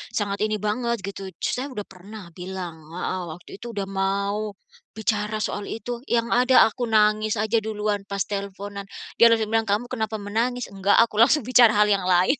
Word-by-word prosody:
sangat 200 -1 -1
ini 215 - -1
banget 235 +3 -1
gitu. 195 0 -6 0.2
Saya 255 +3 -1
sudah 210 -5 -5
pernah 190 0 -12
bilang 180 -1 -6 0.2
heeh, 185 +1 -2
waktu 175 - -17
itu 240 - -8
sudah 200 - -1
mau 200 +2 -1 0.4
bicara 215 -1 -1
soal 205 -1 -3
itu, 240 +1 -5
yang 235 0 0
ada 250 +1 +6
aku 245 +2 -3
nangis 215 0 +3
aja 220 +1 +1
duluan 210 -1 -2
pas 200 -1 -1
teleponan. 200 0 -6 0.3
Dia 235 - +9
terus 230 -1 +3
bilang, 225 +1 0
"Kamu 210 +4 -1
kenapa 220 0 -2
menangis?" 225 +3 -2
"Enggak," 195 +1 +2
aku 220 -2 -3
langsung 270 +5 +5
bicara 240 -2 +5
hal 210 0 +5
yang 195 -2 +1
lain. 185 +9 +3
210 Hz, 180 wpm, -24 LUFS, 200-225 Hz, 0.4 s, Dia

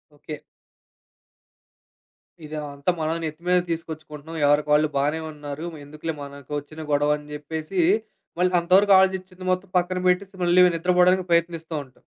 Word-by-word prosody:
Okay. 150 +1 -8 2.1
ఇదంతా 150 +1 -3
మనమే 160 +1 -1
నెత్తి 155 +2 -5
మీద 180 0 +5
తీసుకొచ్చుకుంటున్నాం. 160 -1 -6
ఎవరికి 145 +1 +3
వాళ్ళు 155 +1 +4
బానే 145 +3 +1
ఉన్నారు. 145 0 -7
మేందుకులే 155 +2 -6
మనకోచ్చిన 145 +2 -7
గొడవ? 145 +1 +3
అని 150 0 -14
జెప్పేసి 160 +5 -4 0.6
మళ్ళీ 180 0 +3
అంతవరకు 190 +4 +4
ఆలోచిచ్చిది 190 -1 0
మొత్తం 185 +1 -2
పక్కన 180 +1 0
పెట్టేసి 190 +2 +1
మళ్ళీ 175 +1 +5
నిద్రపోవడానికి 180 +2 +3
ప్రయత్నిస్తా 170 -1 0
ఉంటాం. 130 -2 -23
160 Hz, 125 wpm, -24 LUFS, 150-180 Hz, 2.1 s, మీద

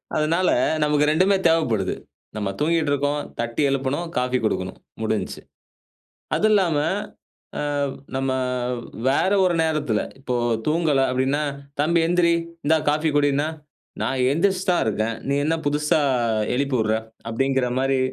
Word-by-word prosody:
அதனால, 165 +4 +2 0.3
நமக்கு 150 0 +2
2மே 185 +6 +3
தேவப்படுது. 120 - +1 0.4
நம்ம 105 -2 -2
தூங்கிட்டு 155 -1 +1
இருக்கோம், 145 +1 0 0.2
தட்டி 120 +3 -2
எழுப்பணும், 135 +5 -1
காஃபி 125 0 +1
குடுக்கணும் 95 -3 -2 0.2
முடிஞ்சிச்சு. 110 -3 -2 1.0
அது 215 - +2
இல்லாம 180 -8 +3 0.8
ஆ - - -1 0.5
நம்ம 135 0 0 0.8
வேற 140 +8 +2
ஒரு 180 -2 +2
நேரத்தில, 155 -9 0 0.2
இப்போ 130 -2 -3 0.3
தூங்கல 155 -3 +2
அப்படின்னா, 130 +3 0 0.4
தம்பி 170 +3 +3
எந்திரி 175 -1 +3 0.3
இந்தா 160 +2 +4
காஃபி 155 +2 +2
குடின்னா, 145 0 +2 0.6
நான் 130 -1 0
எழுந்திரிச்சி 185 +5 +1
தான் 175 - +2
இருக்கேன். 110 +1 -1
நீ 140 - +2
என்ன 160 +2 +1
புதுசா 150 +1 +2 0.5
எழுப்பி 140 +1 0
விடுற? 110 0 +1 0.3
அப்படிங்கிற 130 +2 0
மாரி 135 0 +1
145 Hz, 125 wpm, -23 LUFS, 130-160 Hz, 1.0 s, இந்தா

